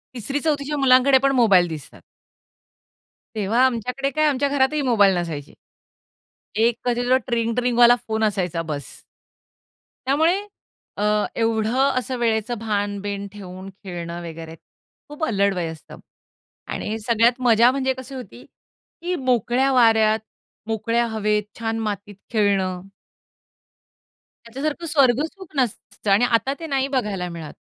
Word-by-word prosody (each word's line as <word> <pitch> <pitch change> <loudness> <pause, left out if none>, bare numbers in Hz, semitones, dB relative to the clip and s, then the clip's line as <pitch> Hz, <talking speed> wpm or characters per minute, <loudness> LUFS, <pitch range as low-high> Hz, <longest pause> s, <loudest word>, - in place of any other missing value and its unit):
3री-4थीच्या 285 +4 -2
मुलांकडे 265 0 +5
पण 275 +1 +2
मोबाईल 195 -8 +5
दिसतात. 145 - -9 1.3
तेव्हा 215 +3 0
आमच्याकडे 250 +3 -1
काय, 310 +3 +1
आमच्या 280 -1 +1
घरातही 285 +1 +1
मोबाईल 205 -7 +4
नसायचे. 160 -5 -5 1.0
एक 230 +2 +3
कधी 245 0 0
तो 260 - +6
ट्रिंग-ट्रिंगवाला 240 0 +3
फोन 220 0 -1
असायचा, 180 -5 0
बस्स. 150 -3 -7 1.0
त्यामुळे, 320 +7 +3 0.6
अ, 205 - -1 0.4
एवढं 225 +4 +2
असं 255 0 -4
वेळेचं 230 0 0
भान-बीन 205 -2 -3
ठेवून 190 -1 -9
खेळणं 175 -2 -6
वगैरे, 160 0 -9 0.5
खूप 295 +2 -7
अल्लड 200 -5 +1
वय 175 -2 -2
असतं 160 - -12 0.7
आणि 215 +1 -3
सगळ्यात 235 +3 +2
मजा 235 +1 +6
म्हणजे 265 0 0
कशी 260 +1 -9
होती, 255 - -10 0.6
की 355 +1 -2
मोकळ्या 250 +3 +2
वाऱ्यात, 220 -3 +4 0.5
मोकळ्या 230 +2 0
हवेत, 210 -1 0 0.2
छान 225 0 -2
मातीत 205 0 -5 0.2
खेळणं. 195 -4 +1 1.6
त्याच्यासारखं 290 +7 -4
स्वर्ग 275 -4 +3
सुख 380 +1 -12
नसतं 215 -5 -2
आणि 205 +5 +5
आता 245 +3 +1
ते 330 - -6
नाही 275 -2 0
बघायला 210 -9 -2
मिळत. 165 -3 -8
230 Hz, 120 wpm, -22 LUFS, 200-260 Hz, 1.6 s, तो